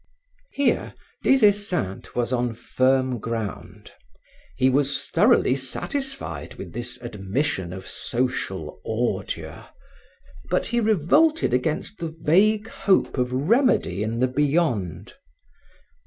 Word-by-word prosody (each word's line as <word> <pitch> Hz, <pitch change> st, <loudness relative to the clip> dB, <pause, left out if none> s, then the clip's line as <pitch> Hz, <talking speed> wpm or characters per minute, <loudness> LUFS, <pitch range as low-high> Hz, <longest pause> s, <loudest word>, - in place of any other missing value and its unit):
Here, 280 Hz, -, 0 dB, 0.3 s
Des 265 Hz, -4 st, +5 dB
Esseintes 200 Hz, -, 0 dB
was 120 Hz, +1 st, 0 dB
on 120 Hz, -2 st, 0 dB
firm 130 Hz, +1 st, +1 dB
ground. 115 Hz, -2 st, -5 dB, 0.7 s
He 130 Hz, -, +3 dB
was 140 Hz, +1 st, +1 dB
thoroughly 130 Hz, -, +3 dB
satisfied 180 Hz, -, -5 dB
with 95 Hz, -8 st, -9 dB
this 120 Hz, +1 st, -5 dB
admission 100 Hz, -, -2 dB
of 95 Hz, 0 st, -8 dB
social 105 Hz, -10 st, -3 dB
ordure, 115 Hz, +2 st, -3 dB, 0.8 s
but -, -, +1 dB
he 240 Hz, +1 st, 0 dB
revolted 225 Hz, -, +3 dB
against 150 Hz, +10 st, -1 dB
the 165 Hz, -2 st, -5 dB
vague 210 Hz, +8 st, +3 dB
hope 190 Hz, -11 st, +1 dB
of 125 Hz, 0 st, 0 dB
remedy 150 Hz, -, +2 dB
in 110 Hz, +2 st, -2 dB
the 130 Hz, -, +4 dB
beyond. 135 Hz, -, 0 dB
130 Hz, 110 wpm, -24 LUFS, 115-190 Hz, 0.8 s, Des